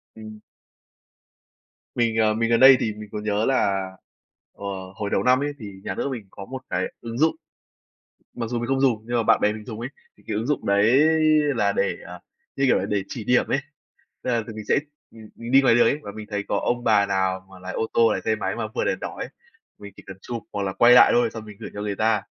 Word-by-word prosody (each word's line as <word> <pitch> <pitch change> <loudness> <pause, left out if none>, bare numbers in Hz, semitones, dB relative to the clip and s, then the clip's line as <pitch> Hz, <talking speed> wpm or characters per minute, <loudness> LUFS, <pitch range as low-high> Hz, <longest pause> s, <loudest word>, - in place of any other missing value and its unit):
Ừm. 110 -1 -10 1.6
Mình, 115 -2 +1
ờ, 110 -1 +3
mình 115 +1 0
gần 115 -1 +3
đây 130 0 +9
thì 110 - -1
mình 105 0 -10
có - - -4
nhớ 105 +1 -1
là, 100 -8 0 0.6
ờ, 100 - -10 0.3
hồi 100 0 -4
đầu - - 0
năm 125 0 +4
ấy 145 +1 -2
thì 105 -4 -8
nhà - - -4
nước - - -2
mình 115 -6 -6
có 100 - -9
một 130 +4 -7
cái 90 +1 -1 0.2
ứng 115 0 -6
dụng. 160 +4 +2 1.0
Mặc 115 -1 -4
dù 120 -1 -2
mình 120 - -3
không 135 0 0
dùng 120 -5 +2
nhưng 120 +1 -1
mà 115 - +1
bạn - - +4
bè 105 - +2
mình 105 0 -9
dùng 110 -3 -7
ấy, 120 +2 -5 0.3
thì 110 - -7
ứng 110 +3 -2
dụng 150 - -1
đấy 100 +5 +4 0.6
là 105 -3 +2
để, - - 0
à, - - -9 0.4
như 135 - +1
kiểu - - +4
là, 95 - -2
để 100 -1 -1
chỉ 115 - -6
điểm 125 +3 +2
ấy. 135 - +1 0.6
Tức - - -2
là 120 -2 +1
tụi 110 - -8
mình 110 0 -7
sẽ, - - +4 0.3
ừm, 110 -1 -14 0.2
đi 135 +1 +7
ngoài 130 - +4
đường 120 - +5
ấy, 145 - +1
và 100 - -8
mình 110 -1 -8
thấy 100 -1 -3
có - - 0
ông 120 0 -1
bà 105 -3 +4
nào 95 -1 -1
mà 95 - -13
lái 90 +1 -7
ô 110 - -2
tô, 115 -1 +4
lái - - -2
xe 110 - +1
máy - - -3
mà 115 -2 -3
vượt - - 0
đèn - - -1
đỏ - - -6
ấy, - - -4 0.5
mình 100 -1 -11
chỉ - - -13
cần 95 - -9
chụp 120 -2 -6
hoặc 100 - -3
là 95 -1 -2
quay 120 +5 +5
lại - - +8
thôi, 120 -1 +3
xong 110 -1 -7
mình 105 -1 -12
gửi - - -7
cho 105 - -5
người 105 -1 -3
ta, 110 -1 +1
110 Hz, 255 wpm, -23 LUFS, 105-120 Hz, 1.6 s, đây